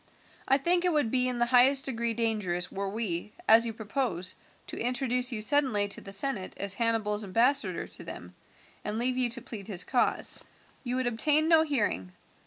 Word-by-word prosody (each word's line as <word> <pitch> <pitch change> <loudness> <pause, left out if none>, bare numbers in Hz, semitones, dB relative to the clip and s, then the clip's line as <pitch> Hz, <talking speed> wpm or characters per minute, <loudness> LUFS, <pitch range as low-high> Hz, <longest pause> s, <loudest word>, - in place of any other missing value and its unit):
I 270 - +5
think 350 +5 +2
it 360 - +2
would 295 -8 +1
be 255 -1 +2
in 250 -1 -2
the 240 - +2
highest 260 +3 +4
degree 235 -3 -1
dangerous 210 -6 -1
were 195 0 -3
we, 210 -2 -2
as 230 +1 +7
you 225 - -3
propose, 215 -5 -3 0.3
to - - -8
introduce 250 +1 0
you 215 -3 -3
suddenly 250 -6 +2
to - - -4
the 195 - -10
senate 200 -1 -2
as 200 0 -2
Hannibal's 220 -1 0
ambassador 240 +8 +1
to - - -7
them, - - -8 0.5
and 210 +1 -2
leave 250 +2 0
you 250 -1 +2
to 235 0 -4
plead 210 -6 -8
his 185 -4 -3
cause. 245 +6 -1 0.4
You 250 -1 -2
would 255 0 0
obtain 295 +7 +2
no 325 -1 +6
hearing. 210 - -1
235 Hz, 190 wpm, -29 LUFS, 210-260 Hz, 0.5 s, as